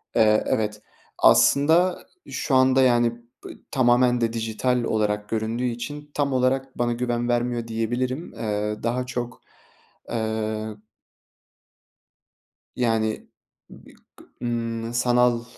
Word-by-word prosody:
Eee, 110 -2 +4
evet, 105 -1 -1 0.4
aslında 165 +6 +4 0.2
şu 135 - -1
anda 130 0 +5
yani 120 -2 +4 0.3
b - - -7 0.2
tamamen 125 -1 +3
de 115 -1 0
dijital 115 +2 -1
olarak 105 -2 -1
göründüğü 115 +2 -2
için 145 +5 -5
tam 140 -2 0
olarak 130 +1 0
bana 120 0 +1
güven 120 0 -2
vermiyor 120 -1 -1
diyebilirim. 125 +6 -2
Eee, 105 -1 -3
daha 125 +2 -1
çok, 125 -1 -5 0.7
eee 110 -1 -2 2.0
Yani 110 -3 0 0.4
bi - - -15 0.2
kı - - -17 0.2
ımm, 115 -1 -3
sanal 120 -1 +2
120 Hz, 110 wpm, -24 LUFS, 110-125 Hz, 2.0 s, anda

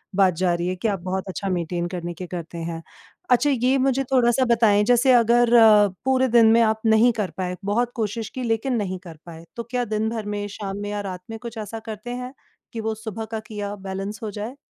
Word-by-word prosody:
बात 190 -2 +4
जा 180 -1 +3
रही 170 +1 -2
है 185 - -1
कि 185 +5 -2
आप 200 -3 -1
बहुत 185 +1 -3
अच्छा 195 +1 -4
मेंटेन 175 -1 -2
करने 175 -1 -5
के 180 +1 -8
करते 170 -1 -7
हैं। 165 0 -5 0.5
अच्छा 250 +4 +4
ये 260 0 +2
मुझे 270 0 +1
थोड़ा-सा 250 0 +3
बताएँ 225 -4 +4
जैसे 245 +3 +4
अगर 240 0 +4 0.6
पूरे 260 0 +3
दिन 235 -1 +5
में 230 +1 +5
आप 220 -1 +2
नहीं 220 +2 +5
कर 200 -3 -1
पाए, 180 -1 -2
बहुत 235 +4 0
कोशिश 220 0 -3
की 255 - -6
लेकिन 235 +2 0
नहीं 185 -4 -3
कर 165 -4 -11
पाए 165 -1 -11
तो 235 - -4
क्या 245 +1 -2
दिन 215 0 -1
भर 225 -2 -4
में, 205 0 -3
शाम 200 -1 -6
में 205 - -4
या 205 0 -3
रात 185 -3 -6
में 225 - -5
कुछ 235 -1 -8
ऐसा 220 +1 -5
करते 220 +1 -7
हैं, 250 +1 -6 0.4
कि 230 - -4
वो 220 0 -2
सुबह 220 0 -6
का 220 0 -5
किया 205 -1 -5
बैलेंस 195 +1 -6
हो 215 - -3
जाए? 215 +5 -6
215 Hz, 230 wpm, -23 LUFS, 190-235 Hz, 0.6 s, दिन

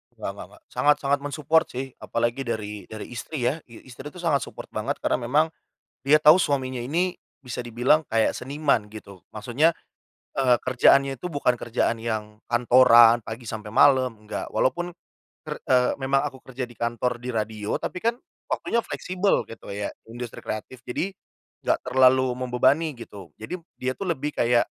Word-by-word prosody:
Nggak - - -4
nggak - - -9
nggak. - - -21
Sangat 150 0 +4
sangat 140 +1 +2
men-support 150 +3 +1
sih, 130 +1 -6
apalagi 120 +3 -2
dari 105 -3 -4
dari 110 +1 -8
istri 125 +3 -5
ya. 130 +7 +1
I 115 - -14
istri 130 +3 -9
itu 165 +5 -10
sangat 150 -5 +2
support - - -10
banget - - -2
karena - - +1
memang 155 +5 +3 0.5
dia 150 +2 +5
tahu 155 +3 +8
suaminya 130 -6 0
ini 175 +8 -1 0.2
bisa 125 -2 -5
dibilang 125 +7 +2
kayak 110 -2 +1
seniman 140 -4 0
gitu. 100 -3 -12
Maksudnya, 125 +10 +2 0.6
eee, 125 -3 +4
kerjaannya 135 +1 +4
itu 180 - -5
bukan 125 -4 +1
kerjaan 115 0 0
yang 110 -2 -4
kantoran 120 -1 +6
pagi 115 0 -7
sampai 110 -1 -6
malem, 130 -3 +5
enggak. 105 - -4
Walaupun 175 +6 0 0.5
ker - - -5
eee, 125 -1 +3
memang 135 +1 +2
aku 135 -2 -11
kerja 130 -1 -4
di 120 - -15
kantor, 120 +1 -1
di 125 - -5
radio 110 -1 -2
tapi 180 - -4
kan 230 +1 +1 0.3
waktunya 235 - 0
fleksibel 185 +2 0
gitu 115 - -11
ya, 100 0 -3 0.2
industri 120 0 -7
kreatif. 120 +3 -6
Jadi, 165 +10 -2 0.6
enggak - - +2
terlalu 130 0 +4
membebani 130 +5 +2
gitu, 100 -7 -11
jadi 140 +12 -5 0.2
dia 130 0 -2
tuh 195 - -4
lebih 150 -3 -1
kayak 120 0 +3
125 Hz, 165 wpm, -25 LUFS, 115-145 Hz, 0.6 s, tahu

